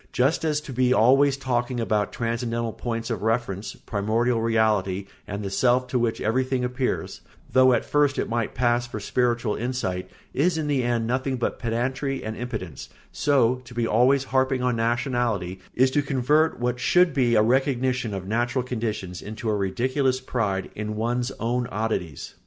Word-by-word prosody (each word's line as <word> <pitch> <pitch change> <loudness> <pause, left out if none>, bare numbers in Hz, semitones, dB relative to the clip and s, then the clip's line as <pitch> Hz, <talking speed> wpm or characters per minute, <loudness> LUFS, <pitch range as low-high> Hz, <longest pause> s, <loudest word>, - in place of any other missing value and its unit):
Just 135 +6 +1
as 150 -2 +1
to 140 - -8
be 125 0 +3
always 135 +4 +4
talking 120 -2 -1
about 105 -3 0
transcendental 115 -1 -2
points 115 0 -4
of 110 - -2
reference, 110 -3 -1
primordial 115 +3 0
reality, 105 -4 +1 0.2
and 100 0 -4
the 100 - -4
self 125 +5 +3
to 125 - +1
which 115 -1 0
everything 130 +3 0
appears, 125 +1 -2 0.3
though 130 0 +6
at 120 - +1
first 145 -1 +2
it - - -1
might 115 -1 -2
pass 120 0 +1
for 110 - -6
spiritual 120 0 0
insight, 110 -7 -3 0.2
is 160 +5 +2
in 160 - -1
the 145 -3 +1
end 120 -2 0
nothing 130 +2 -1
but 120 - -2
pedantry 130 +3 -2
and 110 0 -4
impotence, 110 - -6 0.2
so 130 -4 +2
to 120 -1 -13
be 120 -1 +1
always 125 +5 +3
harping 130 -1 +1
on 125 -1 +1
nationality 115 -5 -1 0.2
is 130 +1 +4
to 145 - +2
convert 145 +3 +1
what 125 0 -1
should 180 +4 +4
be 125 -5 +2
a 105 - +5
recognition 125 -1 +1
of 95 -2 -5
natural 120 +4 0
conditions 110 -7 -4
into 110 +1 -4
a - - +1
ridiculous 130 +7 0
pride 105 -7 -2
in 105 0 -4
one's 120 +3 -1
own 120 +1 -1
oddities. 105 -9 -3
120 Hz, 170 wpm, -25 LUFS, 110-130 Hz, 0.3 s, though